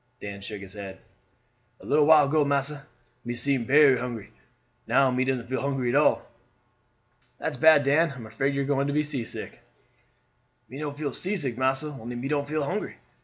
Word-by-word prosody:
Dan 100 -1 -7
shook 100 0 -7
his 95 -1 -11
head. 100 -2 -8 0.8
"A - - -15
little 150 0 +3
while 155 -2 +7
ago, 150 +1 +2
massa, 140 0 -1 0.4
me 120 0 -4
seem 125 0 0
berry 140 0 +5
hungry, 120 -4 -6 0.6
now 130 +3 +3
me 125 +1 +1
doesn't 130 -3 -1
feel 130 +1 -2
hungry 135 -3 -1
at 120 - 0
all." 150 - +3 1.1
"That's 160 - -3
bad, 160 -2 +6
Dan. 150 +4 +3
I - - -12
am 120 -3 -9
afraid 135 +6 -1
you 140 - 0
are - - -3
going 140 0 0
to 145 - -1
be 150 +1 +2
seasick." 135 -6 -6 1.1
"Me 130 +5 -9
no 150 -1 -3
feel 145 -2 -4
seasick, 175 - -2
massa; 130 +4 0
only 120 -4 -8
me 120 +3 -4
don't 145 -1 -1
feel 155 -1 -1
hungry." 185 +9 -3
140 Hz, 190 wpm, -26 LUFS, 120-145 Hz, 1.1 s, while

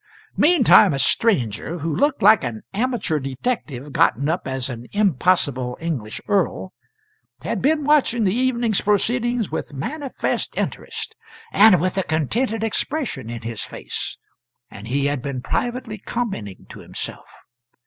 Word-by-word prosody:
Meantime 250 - +6
a - - -1
stranger, 135 - +1
who 160 0 -2
looked 290 -4 +1
like 215 -2 +7
an 115 -3 -4
amateur 225 -8 0
detective 135 - -4
gotten 140 +4 +3
up 170 -1 -1
as 130 -1 -2
an 120 -2 -7
impossible 155 - +1
English 140 -11 -4
earl, 180 - 0 0.7
had 225 - -2
been 300 +3 +2
watching 275 -5 +3
the 190 -2 +2
evening's 240 -3 +1
proceedings 235 +2 +1
with - - -4
manifest 270 - -3
interest, - - -4 0.4
and 205 -4 +7
with 185 +3 0
a - - +1
contented 215 - -1
expression 225 - -2
in 120 0 -6
his 115 -1 -4
face; - - -6 0.5
and 100 +2 -10
he 140 +3 0
had 145 -2 0
been 135 -1 -4
privately 235 - -3
commenting 195 - -4
to - - -11
himself. - - -7
185 Hz, 140 wpm, -22 LUFS, -, 0.7 s, like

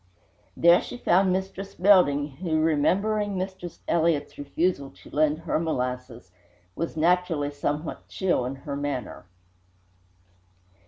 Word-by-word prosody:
There 170 +1 +6
she - - -7
found 190 -4 +3
Mistress 190 +1 -4
Belding, 145 -8 +4
who, 165 -3 0
remembering 195 +7 +1
Mistress 185 -2 -6
Elliott's 160 -3 +1
refusal 145 0 -1
to - - -17
lend 150 0 +2
her 165 -1 -1
molasses, 125 - -3 0.4
was 165 -1 -4
naturally 165 -3 +1
somewhat 145 +2 -4
chill 185 -9 0
in 135 - -4
her 140 +1 -6
manner. 140 -8 -4
160 Hz, 115 wpm, -26 LUFS, 145-185 Hz, 0.4 s, There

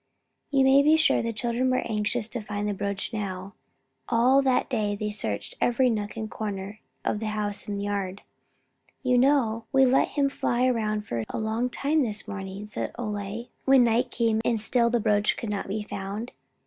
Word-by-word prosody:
You 275 -2 +3
may 265 +1 +6
be 305 +2 +5
sure 315 - +3
the 230 - -2
children 235 +3 0
were 255 - 0
anxious 215 +1 -1
to 240 - -4
find 210 0 -3
the 205 - 0
brooch 200 +3 -3
now. 195 -2 -4 0.6
All 250 +4 +4
that 260 -2 +2
day 210 -5 0
they 210 +1 -3
searched 105 - -4
in - - -23
every 245 +1 +3
nook 210 -1 -3
and 220 -1 -3
corner 205 -1 -5 0.3
of 210 - 0
the 220 - -3
house 210 -1 -3
and 200 -1 -3
yard. 200 -1 -3 0.8
"You 250 -1 +3
know, 245 -5 +2
we 270 -1 +5
let 260 +1 +4
him 285 -2 +1
fly 250 -2 0
around 215 -4 0
for 115 - -3
a - - -4
long 220 +3 -1
time 295 +5 +1
this 220 -4 -2
morning," 195 0 -6
said 210 - -4
Ole, 210 0 -4
when 270 -2 +6
night 240 +2 +2
came 225 -2 +1
and 230 -1 +1
still 235 +2 +2
the 240 0 +1
brooch 205 -1 +2
could 225 -3 -4
not 205 - -3
be 210 +2 -3
found. 205 +3 -5
220 Hz, 195 wpm, -26 LUFS, 205-245 Hz, 0.8 s, may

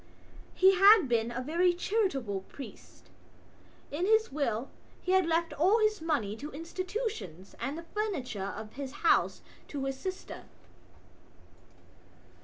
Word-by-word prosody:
He 380 +1 +6
had 395 -3 +7
been 230 -1 +1
a 255 +2 -3
very 345 +5 +2
charitable 285 - -1
priest; 275 - -12 0.8
in 335 +6 -1
his 440 +1 +3
will 265 -3 -2 0.3
he 365 - -1
had 375 -2 +4
left 330 0 +1
all 375 +8 +4
his 430 -4 +1
money 285 -11 -1
to 290 +5 -6
institutions 330 - -5
and 270 +6 -3
the 335 - -7
furniture 260 - -2
of 215 0 -8
his 275 -1 -6
house - - +3 0.3
to 275 -2 -4
his 270 0 -3
sister. 375 +3 -6
315 Hz, 130 wpm, -30 LUFS, 250-375 Hz, 0.8 s, had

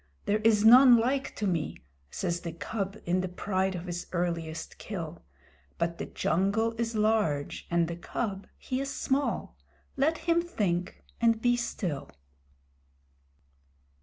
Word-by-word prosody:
"There 210 +1 +2
is 215 -1 +3
none 250 +1 +9
like 265 +4 0
to 210 - -2
me!" 170 -5 -1 0.3
says 175 - -2
the 170 - -4
Cub 195 +3 -4
in 180 +2 +1
the 185 - -2
pride 190 +1 -1
of 175 0 -5
his 175 -1 -5
earliest 170 -2 -3
kill; 170 -5 -6 0.6
But 170 0 -1
the - - -4
jungle 200 +7 +1
is 230 -1 -1
large 210 -10 0
and 170 -1 +2
the 170 0 -5
Cub 195 +2 -4
he 255 - -3
is 275 - -3
small. 275 +1 -1 0.4
Let 310 +4 +2
him 340 +1 +2
think 185 - -2 0.2
and 230 -1 +4
be 245 +1 +3
still. 185 - -3
200 Hz, 140 wpm, -29 LUFS, 175-230 Hz, 0.6 s, none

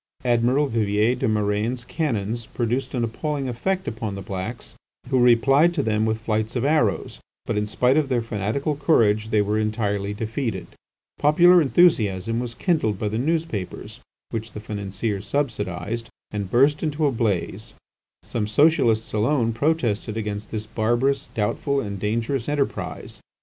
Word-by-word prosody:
Admiral 120 +4 +3
Vivier 110 -1 +1
des 125 - -1
Murènes' 110 +3 -1
cannons 115 - -2
produced 120 +3 -2
an 120 - 0
appalling 140 +4 -2
effect 185 +10 -2
upon 110 -3 -4
the 100 - -6
blacks, 100 +4 -6 0.4
who 130 - +3
replied 135 +8 +4
to 145 - +1
them 110 -1 +1
with 110 0 0
flights 110 +1 -1
of 125 +1 0
arrows, 140 -9 +1 0.3
but 115 - -2
in 105 0 0
spite 125 +5 +2
of 150 -3 +1
their 120 -3 +1
fanatical 115 +7 -2
courage 110 -8 +2
they 105 -2 +3
were 105 +1 0
entirely 105 -2 -1
defeated. 110 -1 -3 0.5
Popular 175 +4 +6
enthusiasm 115 - +3
was 120 -1 -5
kindled 150 - 0
by 105 - -2
the 110 +2 -2
newspapers 155 - -3 0.3
which 110 0 -5
the - - -6
financiers 100 -1 -4
subsidised, 115 -4 -2 0.2
and 100 -2 -4
burst 140 +6 +3
into 155 -1 0
a 140 - +3
blaze. 110 -3 -2 0.5
Some 105 -3 -3
Socialists 115 -3 +3
alone 115 +1 +1
protested 115 -5 0
against 105 -1 -4
this 110 -1 -4
barbarous, 120 +5 0
doubtful, 140 +6 0
and 100 -5 -4
dangerous 115 +5 -1
enterprise. 145 -2 -3
115 Hz, 150 wpm, -23 LUFS, 105-135 Hz, 0.5 s, Popular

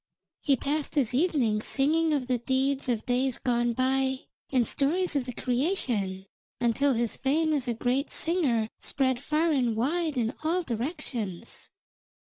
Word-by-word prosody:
He 280 - +2
passed 290 +4 -2
his 260 -5 +1
evenings 250 -8 +1
singing 315 +4 +2
of 285 -4 0
the 250 -1 0
deeds 265 +2 0
of 230 -3 -1
days 250 +1 0
gone 240 -1 0
by 265 +1 +1 0.3
and 255 -3 +3
stories 320 +7 +1
of 275 -3 0
the 250 - -4
creation, 240 - -1 0.3
until 260 +4 +2
his 235 -1 -1
fame 310 +4 +1
as 275 -4 -1
a 240 - 0
great 255 +5 0
singer 280 -11 +1
spread 260 -3 0
far 310 +3 +1
and 245 -6 +1
wide 305 +5 0
in 235 0 0
all 345 +3 +1
directions. 240 - -4
265 Hz, 150 wpm, -28 LUFS, 240-300 Hz, 0.3 s, and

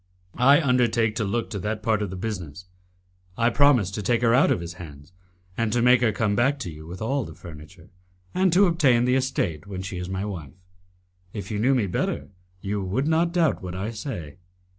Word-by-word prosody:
"I 140 +4 +6
undertake 120 -6 +2
to 115 - 0
look 110 +3 -2
to 100 - -3
that 105 +2 -3
part 110 -1 +1
of 105 - -2
the 95 - -6
business. 90 -5 -6 0.7
I 115 +1 +2
promise 125 -8 +4
to 105 - -4
take 120 +4 +1
her 115 -1 +4
out 125 - +5
of - - +1
his 85 0 -6
hands, 75 -1 -12 0.4
and 115 0 -1
to 120 - +2
make 125 0 +5
her 115 -3 +3
come 105 0 0
back 135 +6 +2
to 85 - -5
you 80 +1 -11
with 90 +4 -7
all 135 +4 0
the - - -10
furniture, 85 +2 -13 0.4
and 185 0 +2
to 190 +4 +5
obtain 135 -9 +3
the 125 - +2
estate 115 - -1
when 95 -2 -6
she 95 -1 -5
is 90 0 -5
my 95 +1 -3
wife. 85 -9 -7 0.8
If 105 +1 -6
you 105 - -2
knew 130 +5 +3
me 120 -5 +1
better, 90 - -2 0.3
you 100 +1 -2
would 115 +10 -1
not 165 +2 +2
doubt 170 -5 +1
what 90 -1 -6
I 100 +5 -3
say. 90 - -6
110 Hz, 215 wpm, -24 LUFS, 90-125 Hz, 0.8 s, I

